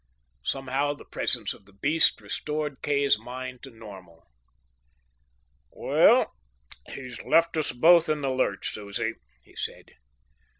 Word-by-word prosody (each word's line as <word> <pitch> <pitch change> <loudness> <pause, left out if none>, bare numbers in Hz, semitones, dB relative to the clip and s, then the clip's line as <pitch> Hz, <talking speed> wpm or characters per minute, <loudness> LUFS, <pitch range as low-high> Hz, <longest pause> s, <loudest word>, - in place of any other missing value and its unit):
Somehow 135 - -1
the - - -15
presence - - +4
of 100 - -19
the 100 - -21
beast 150 +11 +2
restored 150 -2 -4
Kay's 140 -5 +2
mind 125 +2 -8
to 135 - -10
normal. 100 -8 -13 1.5
"Well, - - +3 0.6
he's 125 -3 -8
left 165 +1 +2
us 155 -2 -1
both 165 +5 +5
in 155 -1 0
the 135 -1 -1
lurch, 130 -7 -1
Susie," 105 +2 -4 0.3
he - - -22
said. - - -7
130 Hz, 125 wpm, -26 LUFS, 110-150 Hz, 1.5 s, both